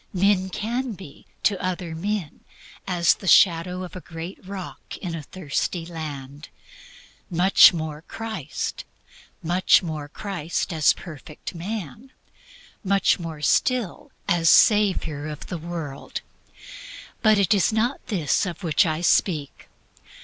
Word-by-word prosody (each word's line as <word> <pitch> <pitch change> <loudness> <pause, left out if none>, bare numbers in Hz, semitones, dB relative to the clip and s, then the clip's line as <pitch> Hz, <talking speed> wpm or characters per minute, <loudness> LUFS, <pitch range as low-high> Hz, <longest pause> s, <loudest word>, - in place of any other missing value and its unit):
Men 190 0 +2
can 240 +5 -3
be 170 -7 -13 0.2
to 200 -3 +1
other 180 -2 -3
men 190 -1 -3 0.5
as 175 -3 +3
the 190 - -10
shadow 180 +1 +4
of 180 -1 -9
a 185 - -7
great 165 +4 -8
rock 190 -1 -8
in 175 -3 -5
a 160 -2 -5
weary 170 0 -2
land; 150 -3 -7 0.8
much 180 +2 +7
more 155 -3 -5
Christ; 220 -6 -5 0.6
much 180 +3 +4
more 155 -3 -5
Christ 175 0 -3
as 155 -2 +4
Perfect 155 -2 -9
Man; 205 - -6 0.7
much 195 -1 +2
more 160 -3 -7
still 245 - +1 0.2
as 165 -2 +3
Savior 185 -9 +4
of 150 -1 -7
the 175 - -5
world. 160 -4 -6 1.0
But 215 -2 +5
it 200 -2 +3
is 200 0 +3
not 230 +5 0
this 180 - +1
of 180 +2 -7
which 165 +2 +3
I 155 +1 -1
speak. 160 -4 +1
175 Hz, 130 wpm, -24 LUFS, 160-195 Hz, 1.0 s, much